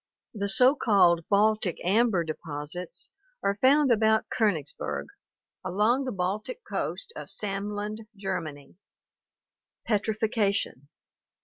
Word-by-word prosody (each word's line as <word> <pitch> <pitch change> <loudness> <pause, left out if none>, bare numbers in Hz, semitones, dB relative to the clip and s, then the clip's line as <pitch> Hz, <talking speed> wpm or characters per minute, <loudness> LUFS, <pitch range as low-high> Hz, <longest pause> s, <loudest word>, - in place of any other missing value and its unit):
The 200 -2 -2
so 255 +6 +6
called 175 - +3
"Baltic 210 -2 +2
amber" 205 -1 +3
deposits 155 +2 -6 0.3
are 200 +1 0
found 275 +1 +5
about 220 -1 +3
KSnigsberg, 170 - -1 0.6
along 210 +9 +1
the 255 - -2
Baltic 205 - -3
coast 475 -2 -2
of - - -7
Samland, 210 +2 -4
Germany 165 -7 -5 1.1
(see 230 - +1
Fig. 205 +1 +1
09). 220 - 0
Petrifaction. 200 - -1
205 Hz, 110 wpm, -27 LUFS, 180-220 Hz, 1.1 s, so